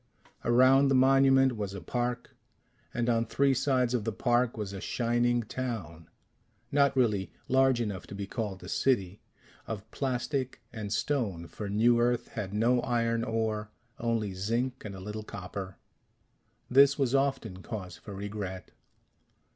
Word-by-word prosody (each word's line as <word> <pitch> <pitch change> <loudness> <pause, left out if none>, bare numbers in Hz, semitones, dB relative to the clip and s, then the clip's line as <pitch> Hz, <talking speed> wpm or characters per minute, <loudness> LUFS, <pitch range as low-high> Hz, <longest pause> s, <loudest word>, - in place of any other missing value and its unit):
Around 130 +3 +5
the 135 - +3
monument 135 0 +5
was 100 -2 -4
a - - -5
park, 120 +2 -3 0.6
and 120 0 -1
on 115 -1 +3
three 135 +4 +2
sides 130 -2 +1
of 120 -4 0
the 115 - -1
park 120 +2 +1
was 100 -2 -4
a 95 - -6
shining 120 +1 +1
town 100 -10 -5 0.6
not 140 -1 +3
really 105 -6 +1 0.2
large 130 -1 +4
enough 100 -6 -3
to - - -8
be 100 0 -4
called 100 -3 -4
a - - -8
city 100 -4 0 0.5
of 105 -2 -5
plastic 130 0 -2
and 105 -3 -5
stone, 105 - -1
for 100 +4 -6
New 115 +4 +4
Earth 120 0 +1
had 105 -5 -5
no 120 +4 +2
iron 115 -1 0
ore, 110 -2 -1 0.3
only 115 -4 -1
zinc 115 +7 -2
and 100 -2 -6
a - - -8
little 105 +3 -5
copper. 95 -2 -7 0.9
This 140 +2 +6
was 135 -3 +1
often 135 -9 0
cause 95 -5 -6
for 100 +5 -9
regret. 100 -2 -6
115 Hz, 150 wpm, -29 LUFS, 100-125 Hz, 0.9 s, This